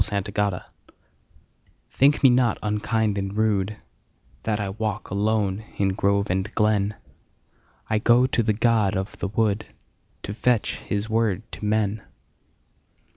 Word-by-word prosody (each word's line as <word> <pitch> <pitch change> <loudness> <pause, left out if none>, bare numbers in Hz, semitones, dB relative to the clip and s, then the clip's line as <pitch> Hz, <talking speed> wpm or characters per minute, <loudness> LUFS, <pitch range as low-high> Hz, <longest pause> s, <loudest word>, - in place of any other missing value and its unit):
The 100 0 +1 0.2
Apology 100 -3 0 1.3
THINK 145 +3 +3
me 130 - +8
not 120 -2 +3
unkind 105 0 0
and 95 0 -3
rudeThat 105 +1 -3
I 100 -2 -2
walk 105 0 -4
alone 105 0 0
in 100 -1 +2
grove 100 +1 +1
and 95 +3 -1
glen;I 105 +1 -3
go 120 +3 +4
to 130 -2 +1
the 110 -1 +1
god 110 -3 +2
of 95 +1 -5
the 100 - -2
woodTo 105 -1 -4
fetch 120 0 +1
his 100 +1 -3
word 110 -3 0
to - - -9
men. 105 0 0
105 Hz, 125 wpm, -24 LUFS, 100-110 Hz, 1.3 s, me